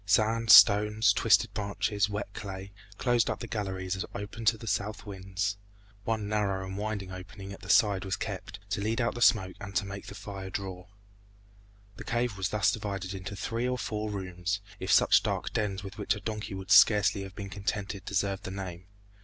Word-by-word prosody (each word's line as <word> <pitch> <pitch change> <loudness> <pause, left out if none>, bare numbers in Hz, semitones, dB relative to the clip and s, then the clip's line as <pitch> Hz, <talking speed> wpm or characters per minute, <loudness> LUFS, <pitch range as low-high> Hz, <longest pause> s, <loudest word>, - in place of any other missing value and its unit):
Sand, 110 +2 +2
stones, 105 +1 +8
twisted 115 -1 +3
branches, 100 0 0
wet 105 0 -4
clay, 95 -1 -7 0.3
closed 120 -4 +2
up - - -2
the - - -5
galleries 95 -4 -3
open 105 +3 -6
to 110 +1 +4
the 115 - -10
south 105 0 -2
winds. 95 0 -3 0.5
One 110 -2 -1
narrow 100 -3 0
and 95 0 -6
winding 100 -2 -3
opening 95 +2 -8
at 100 - -12
the 100 - -11
side 100 -3 +4
was 95 -1 -1
kept, 100 -2 -6
to 105 -2 -1
lead 110 +3 0
out 115 - +1
the 120 - -7
smoke 95 -6 +4
and 100 -1 -8
to 100 - +1
make 100 0 -7
the 100 - -8
fire 100 -3 -7
draw. 95 -1 -5 1.1
The - - -7
cave 120 -2 -1
was 95 -1 -1
thus 105 -1 +2
divided 100 -3 -4
into 95 +1 -6
three 115 +4 -2
or 125 - -1
four 110 -3 -3
rooms, 95 -1 -3 0.2
if 95 - -2
such - - +6
dark - - -2
dens 100 -2 -1
with 100 +2 -9
which 105 - +1
a - - -7
donkey 105 -1 -5
would 95 +1 -6
scarcely 105 -2 +6
have 95 -1 -8
been 100 -1 -7
contented 100 0 -3
deserved 100 0 -1
the - - -6
name. 95 -2 -7
100 Hz, 195 wpm, -29 LUFS, 95-105 Hz, 1.1 s, stones